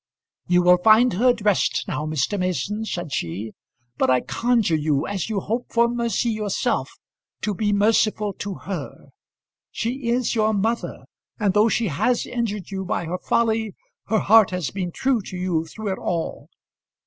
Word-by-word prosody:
"You 180 0 +3
will 180 0 +6
find 220 +5 +5
her 245 +7 +4
dressed 210 -5 0
now, 150 +1 -3
Mr. 155 +7 -1
Mason," 190 +4 -2
said 175 -8 -4
she; 95 +7 -3 0.5
"but - - +2
I 130 -1 +4
conjure 230 -7 +1
you, 150 -1 0
as 200 0 -3
you 210 -3 0
hope 230 +6 -3
for 235 0 +4
mercy 235 -1 -1
yourself, 210 -3 -1 0.5
to 210 - -1
be 205 +2 0
merciful 210 0 +2
to 200 -2 -4
her. 190 0 -7 0.6
She 240 +1 -3
is 245 0 +1
your 220 -2 +2
mother, 225 +4 -1 0.4
and 205 -3 +1
though 210 +3 +4
she 220 -2 0
has 235 - 0
injured 210 -6 -3
you 190 -1 -3
by 175 -1 -2
her 180 +3 -3
folly, 220 0 0 0.3
her 220 0 +1
heart 220 -1 +6
has 180 -5 -3
been 185 -3 -3
true 260 +4 0
to 185 -1 -8
you 175 -3 -1
through 210 +5 -5
it 190 - -4
all. 170 -2 -3
205 Hz, 170 wpm, -23 LUFS, 180-225 Hz, 0.6 s, will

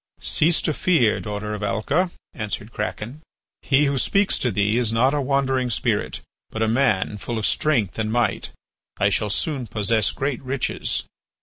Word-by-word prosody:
"Cease 165 +2 +2
to 155 - +1
fear, 150 -11 +2
daughter 105 0 -4
of 105 - -5
Alca," 135 - 0 0.2
answered 105 0 -3
Kraken. 110 +7 -4 0.4
"He 140 +1 +3
who 140 -1 +1
speaks 200 +7 +2
to 125 - +1
thee 105 +2 +1
is 115 -3 +2
not 125 +5 +3
a 145 - +1
wandering 135 -2 +1
spirit, 110 - -1 0.3
but 110 - -2
a - - +2
man 110 -4 +1
full 115 +5 -4
of 110 - -1
strength 120 -11 +1
and 110 0 -1
might. 115 -4 0 0.5
I 100 - +3
shall 105 +1 0
soon 135 +3 -2
possess 110 0 +1
great 135 -2 -2
riches." 135 0 -2
115 Hz, 170 wpm, -23 LUFS, 105-140 Hz, 0.5 s, He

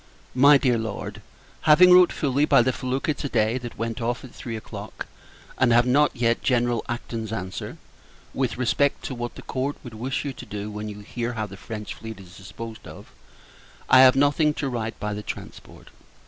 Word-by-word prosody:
MY 140 +3 +7
DEAR 125 -4 +1
LORD, 110 -2 -5 0.5
Having 180 +4 +8
wrote 180 -1 +7
fully 140 -1 0
by 120 - +5
the 130 +1 +1
felucca 130 +4 -1
to 145 0 -5
day, 115 +1 +1
that 120 -2 -8
went 115 +1 -3
off 120 +1 -2
at 130 - -11
three 120 -4 -6
o'clock 110 - -8 0.5
and 130 -2 +4
have 120 +1 +5
not 140 +4 +3
yet 115 -1 +1
General 120 -3 +1
Acton's 115 -2 -4
answer, 95 -4 -5 0.6
with 130 -3 -1
respect 135 +3 +1
to 140 - -4
what 120 -1 -5
the - - -10
Court 135 +2 -2
would 120 -4 -9
wish 130 +6 -3
you 140 - -3
to 125 - -10
do 105 +1 -5
when 105 +1 -5
you 105 0 -8
hear 120 +3 -4
how 110 -2 -2
the 100 -1 -10
French 105 +1 -7
fleet 110 -2 -9
is 90 -2 -14
disposed 110 +4 -9
of - - -12 0.8
I 130 - +8
have 130 0 +8
nothing 145 +2 +3
to 140 - -2
write 115 -3 -4
by 105 0 -3
the 105 - -5
transport. - - -9
120 Hz, 195 wpm, -24 LUFS, 110-130 Hz, 0.8 s, Having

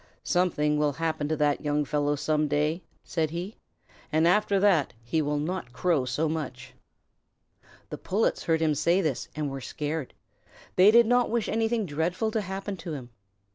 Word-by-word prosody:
"Something 150 -5 +1
will 150 -1 +2
happen 160 -1 -2
to 155 - 0
that 145 -1 +1
young 150 0 0
fellow 145 0 0
some 150 +1 0
day," 150 +4 0 0.2
said 160 -3 -1
he, 175 +6 -5 0.6
"and 160 +2 +3
after 200 +1 +3
that 190 -8 +3
he 155 +7 0
will 150 0 -1
not 150 -4 -3
crow 150 -1 +1
so 140 +6 0
much." 150 -5 -5 1.2
The - - -5
Pullets 205 +4 0
heard 160 -1 +2
him 155 -2 +3
say 170 +6 +2
this 145 -7 -2
and 150 -1 -2
were 135 0 -5
scared. 150 +2 -4 0.6
They 185 +3 +7
did 235 +2 +7
not 245 +1 +3
wish 235 -2 0
anything 225 0 0
dreadful 175 +7 -1
to 220 - 0
happen 195 +1 -5
to 165 -1 -6
him. 125 -4 -7
160 Hz, 175 wpm, -27 LUFS, 145-185 Hz, 1.2 s, They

